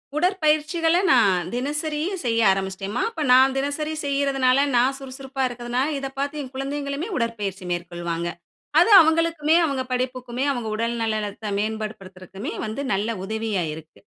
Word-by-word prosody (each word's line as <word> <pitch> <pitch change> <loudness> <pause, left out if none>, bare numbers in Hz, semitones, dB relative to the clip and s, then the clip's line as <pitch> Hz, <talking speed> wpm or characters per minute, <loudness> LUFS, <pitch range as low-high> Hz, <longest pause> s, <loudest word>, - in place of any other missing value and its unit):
உடற்பயிற்சிகள 325 -1 +2
நான் 190 -8 +4
தினசரியும் 300 +7 -2
செய்ய 230 -1 +2
ஆரம்பிச்சிட்டேன்ம்மா. 195 +3 -2
இப்ப 310 - -3
நான் 265 +1 +6
தினசரி 285 +3 -2
செய்யிறதுனால, 275 -1 +2
நான் 255 +3 +3
சுறுசுறுப்பா 270 0 -6
இருக்கதுனால, 245 +2 -2
இத 270 0 -4
பாத்து 285 +2 -2
என் 255 - -10
குழந்தைங்களுமே 280 +6 -3
உடற்பயிற்சி 210 -5 -3
மேற்கொள்வாங்க. 175 -1 -3 0.5
அது 355 - +4
அவுங்களுக்குமே, 325 0 +2
அவுங்க 275 -4 -1
படிப்புக்குமே, 250 0 -2
அவுங்க 240 -5 -3
உடல் 230 +2 -1
நலத்த 215 -1 -3
மேன்பாடு 215 0 -2
படுத்துறதுக்குமே 190 +4 -8
வந்து 220 +6 -4
நல்ல 205 +4 0 0.2
உதவியா 220 -3 -2
இருக்கு. 160 0 -12
255 Hz, 130 wpm, -23 LUFS, 215-285 Hz, 0.5 s, நான்